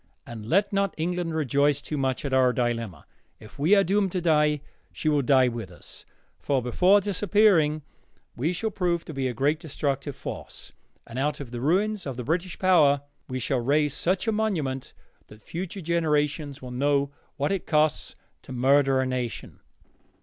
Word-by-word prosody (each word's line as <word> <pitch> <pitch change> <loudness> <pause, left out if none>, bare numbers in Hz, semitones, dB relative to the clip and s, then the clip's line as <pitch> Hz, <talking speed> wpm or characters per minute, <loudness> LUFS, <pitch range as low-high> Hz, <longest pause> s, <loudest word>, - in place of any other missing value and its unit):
And 110 -2 -8
let 200 - +2
not 195 -2 0
England 170 0 -2
rejoice 145 -1 +2
too 150 +2 -5
much 135 -1 -1
at 135 - -2
our 130 -1 +4
dilemma. 115 -6 -2 0.3
If 110 +4 -15
we 165 +8 +5
are 200 - +5
doomed 195 0 +1
to 185 - 0
die, 150 -3 +2 0.3
she 155 - -2
will 150 -1 +2
die 130 -1 +4
with 115 -5 -4
us, 90 - -11 0.3
for 140 -2 0
before 180 - +3
disappearing 190 -6 +3 0.5
we 145 +8 0
shall 220 +5 -2
prove 175 -4 -1
to 160 - -8
be 135 -2 -1
a 125 - -4
great 145 +3 +1
destructive 140 -3 -3
force, - - -8 0.3
and 120 +2 -6
out 145 +2 -1
of 135 -5 -8
the 120 -1 -5
ruins 190 +5 +1
of 130 -3 -5
the 125 - -4
British 170 +6 -2
power 150 -7 +4 0.3
we 130 - -3
shall 130 +1 -1
raise 145 +4 +1
such 185 +5 -1
a - - +3
monument 165 -12 -2 0.3
that 105 0 -16
future 185 +3 -6
generations 150 -4 -1
will 125 - -7
know 140 +2 +1 0.3
what 145 +5 0
it 195 -2 -2
costs 155 -1 +1 0.3
to - - -12
murder 135 +1 +3
a - - 0
nation. 125 -3 -4
145 Hz, 180 wpm, -26 LUFS, 130-175 Hz, 0.5 s, we